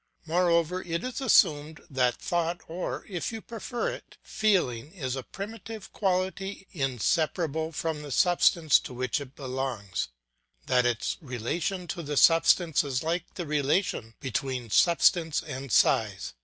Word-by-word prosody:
Moreover 170 +1 +2
it 170 -1 -3
is 255 +1 -4
assumed 155 - +3
that 125 -3 +1
thought 170 0 -1
or, 175 +3 -4
if 185 +2 -3
you 225 - -5
prefer 235 - -4
it, - - -9
feeling 160 - 0
is 130 -9 -3
a 135 - -3
primitive 220 - -8
quality 190 0 -1
inseparable 155 - 0
from 160 -1 -3
the 150 - -8
substance 170 0 +4
to 125 - -9
which 130 +3 -1
it 140 0 -10
belongs, 130 -8 -3 0.6
that 125 -1 +3
its 120 -3 -1
relation 160 - -3
to 175 - -3
the 145 -2 -4
substance 165 0 +5
is 135 -1 -2
like 170 +1 -2
the 175 - -4
relation 145 - 0
between 130 -2 -3
substance 170 - +3
and 135 -3 -6
size. 105 -4 +2
160 Hz, 140 wpm, -28 LUFS, 130-180 Hz, 0.6 s, substance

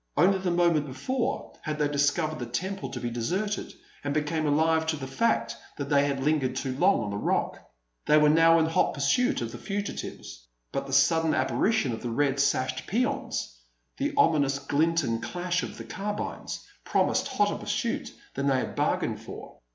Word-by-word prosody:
Only 190 +1 +4
the 185 -1 -1
moment 170 -4 +2
before 235 - -2
had 155 -1 -3
they 150 -1 +2
discovered 145 +2 +1
the 120 - -4
temple 190 +11 -3
to 125 - -5
be 120 -1 -3
deserted, 185 - -2 0.3
and 145 0 -2
become 155 +1 0
alive 160 +2 +2
to 160 - +1
the 140 -3 -6
fact 130 - 0 0.2
that 140 -1 -4
they 145 -1 +4
had 135 -1 -2
lingered 140 -4 +1
too 130 -1 -2
long 185 +7 +3
on 105 - -4
the 100 - -3
Rock. - - -1 0.5
They 150 - +6
were 150 0 +5
now 165 +1 +6
in 160 - +3
hot 160 - +1
pursuit 140 - +2
of 115 - -4
the - - -8
fugitives. 200 - -5 0.2
But - - -3
the - - -7
sudden 160 +3 +4
apparition 220 - +1
of 110 - -6
the 120 - -3
red 135 +3 +1
sashed 135 -2 0
peons, 245 - -1 0.4
the - - 0
ominous 145 -4 +3
glint 155 +4 +1
and 115 -2 -1
clash 180 +8 -2
of - - -6
the - - -7
carbines, 210 -1 -5 0.2
promised - - +1
hotter 205 0 +1
pursuit 215 +3 -2 0.2
than 140 +1 -1
they 135 -1 +3
had - - -3
bargained - - 0
for. - - -10
150 Hz, 185 wpm, -27 LUFS, 135-180 Hz, 0.5 s, They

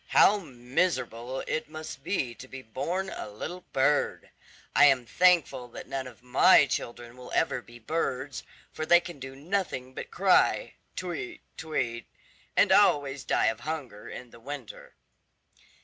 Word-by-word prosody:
How 210 - +6
miserable 125 - -2
it 155 -1 -2
must 155 -3 -8
be 145 -9 -1
to 130 - -12
be 130 0 -9
born 175 - -3
a - - -6
little 175 +13 -7
bird! 140 +2 +1 0.4
I 145 - +8
am 135 -4 +4
thankful 170 -5 +3
that 120 - -9
none 135 -1 -4
of 120 -1 -14
my 145 +6 +6
children 120 -2 -4
will 125 0 -11
ever 125 - +1
be 120 0 -14
birds, 135 +1 -2 0.3
for - - -4
they 175 +2 +6
can 175 -4 -9
do 135 0 -8
nothing 150 -5 -3
but - - -7
cry, - - +3 0.2
'Tweet, 185 - -5
tweet,' 120 -8 -3 0.5
and - - +5
always 140 -2 +4
die - - +2
of 110 - +1
hunger 140 -10 -6
in 125 -2 -9
the 115 - -14
winter." 135 -1 -9
135 Hz, 150 wpm, -28 LUFS, 125-160 Hz, 0.5 s, I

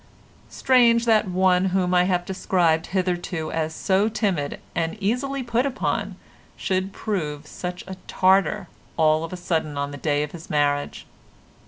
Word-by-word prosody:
Strange 235 -2 +4
that 220 -2 +3
one 185 0 +3
whom 185 -1 +1
I 180 0 +4
have 180 -1 0
described 175 -4 +1
hitherto 180 -3 -2
as 160 0 -2
so 200 +2 +2
timid 195 -10 -1
and 165 +5 -2
easily 255 +7 -1
put 235 +1 +1
upon 270 -2 -2 0.4
should 190 0 -1
prove 155 -9 -3
such 180 +3 -6
a 190 - -7
Tartar 190 +1 +2 0.3
all 155 0 +3
of 165 - -6
a 185 - -5
sudden 160 -4 -2
on 140 0 -2
the 145 - -7
day 145 0 0
of 150 - -6
his 165 -2 -11
marriage. 145 -1 0
180 Hz, 155 wpm, -23 LUFS, 160-200 Hz, 0.4 s, Strange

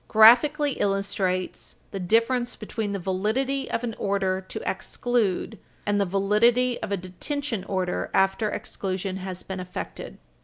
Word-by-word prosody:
283, 230 +6 +8
graphically 295 -1 -1
illustrates 195 -2 -1 0.2
the 195 - -4
difference 230 +6 +2
between 215 -1 -4
the 200 - -1
validity 220 +9 -1
of 230 - -1
an 235 -2 -2
order 195 -2 0
to 185 - -6
exclude 220 0 -1 0.3
and 205 0 +2
the - - +3
validity 215 +6 +3
of 220 - -4
a 200 - +1
detention 220 +6 -4
order 185 -2 -1
after 195 +3 +2
exclusion 190 -1 -3
has 185 -1 -6
been 190 -1 -5
effected. 180 0 -6
200 Hz, 145 wpm, -26 LUFS, 190-235 Hz, 0.3 s, 283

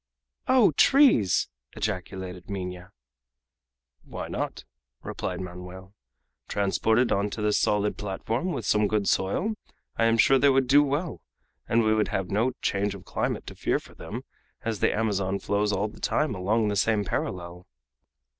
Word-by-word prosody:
"Oh, 255 -8 +5
trees!" 255 - +5 0.3
ejaculated 95 -3 -4
Minha. 90 -2 -5 1.1
"Why - - -7
not?" - - -4 0.4
replied - - -4
Manoel. 90 +1 -9 0.5
"Transported 110 +4 +1
on 100 +1 +1
to 105 - -6
this 105 0 +2
solid 105 0 +1
platform, 110 - -2
with 130 -9 -4
some 105 0 +3
good 105 -1 0
soil, 185 - +1 0.4
I 115 - +3
am 115 0 +3
sure 135 +3 +5
they 140 +2 +5
would 135 -1 +3
do 140 +3 +6
well, 145 +4 -2 0.5
and 115 0 +3
we 110 0 +3
would 110 -1 +2
have 95 -2 -3
no 115 +6 +1
change 100 0 0
of 95 - -12
climate - - -2
to - - -8
fear - - 0
for - - -12
them, - - -7 0.4
as 110 -3 -2
the - - +3
Amazon 100 -3 0
flows 105 +2 0
all 105 +1 0
the 105 - -13
time 150 -6 0
along 105 +3 +1
the 100 - -1
same 105 +1 +2
parallel." 90 -1 -4
105 Hz, 155 wpm, -26 LUFS, 95-115 Hz, 1.1 s, do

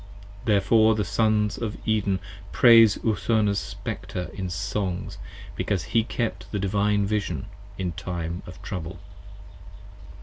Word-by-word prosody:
Therefore 110 +1 +4
the 105 -1 0
Sons 105 +1 +1
of 110 -3 -3
Eden 100 -3 +1 0.3
praise 115 -3 +7
Urthona's 110 -2 +2
Spectre 90 -2 -5
in 95 -2 -4
songs, 100 0 -3
20 - - -12 0.3
Because 95 -5 -1
he 115 -1 +1
kept 115 0 -3
the 105 - -1
Divine 100 +1 +1
Vision 100 -8 -2 0.3
in 90 -2 -2
time 85 +1 -4
of 85 -3 -10
trouble. 90 -2 -5
100 Hz, 125 wpm, -25 LUFS, 90-110 Hz, 0.3 s, praise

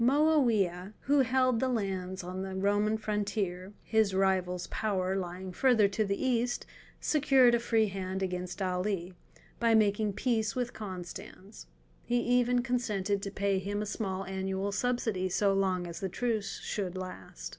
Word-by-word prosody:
Moawiah, 235 - +3
who 285 +2 +3
held 255 -2 +3
the 260 - +1
lands 190 -5 -2
on 185 +1 -5
the 190 0 -5
Roman 205 +3 +2
frontier—his 205 0 -1
rival's 185 -2 +1
power 190 -3 0
lying 185 0 -4
further 235 -2 +4
to 215 +2 0
the 200 -1 -1
east—secured 255 +2 +2
a 235 - +4
free 225 -1 +2
hand 190 -1 -3
against 180 +1 -3
Ali, 185 0 -1 0.5
by 230 -1 +4
making 210 -1 +2
peace 220 -1 0
with 245 -1 -2
Constans. 180 - -8 0.4
He 245 - 0
even 245 0 +2
consented 210 -5 -1
to 200 - -4
pay 200 -1 0
him 205 +2 -2
a - - -4
small 195 -2 -3
annual 190 +1 -2
subsidy 215 -4 0
so 195 +2 +2
long 190 -2 +1
as 170 -1 -6
the 190 - -2
truce 220 0 -2
should 185 -3 -3
last. 185 - -7
200 Hz, 145 wpm, -30 LUFS, 185-230 Hz, 0.5 s, further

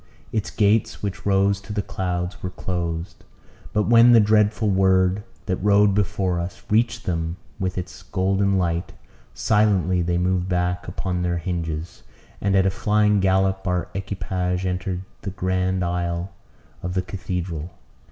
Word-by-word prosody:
Its 110 -1 -1
gates, 105 +1 +1
which 100 0 -4
rose 100 0 +3
to 100 - -9
the 105 -1 -1
clouds, 90 -1 -3
were 90 - -3
closed. 85 -2 -4 0.5
But 105 - +2
when 120 +1 +7
the 115 - +8
dreadful 105 +1 +3
word, 95 0 +3 0.2
that 95 -4 -1
rode 100 0 +4
before 95 -3 0
us, 85 +1 -6
reached 115 +2 +2
them 85 -1 -2 0.2
with 95 -1 -2
its 90 - -6
golden 95 +1 +1
light, 85 -1 -1 0.4
silently 95 -5 +2
they 85 0 0
moved 90 0 0
back 90 0 -1
upon 90 0 -2
their 90 -1 0
hinges; 85 -2 -4 0.4
and 100 -1 +2
at 95 0 +4
a 95 - +3
flying 105 +1 +2
gallop 95 0 +1
our 90 -1 0
equipage 95 -2 -2
entered 90 0 -2 0.2
the - - -4
grand 95 0 0
aisle 85 +1 -2 0.5
of 90 0 -4
the 95 - +1
cathedral. 90 -3 -4
95 Hz, 150 wpm, -23 LUFS, 90-100 Hz, 0.5 s, the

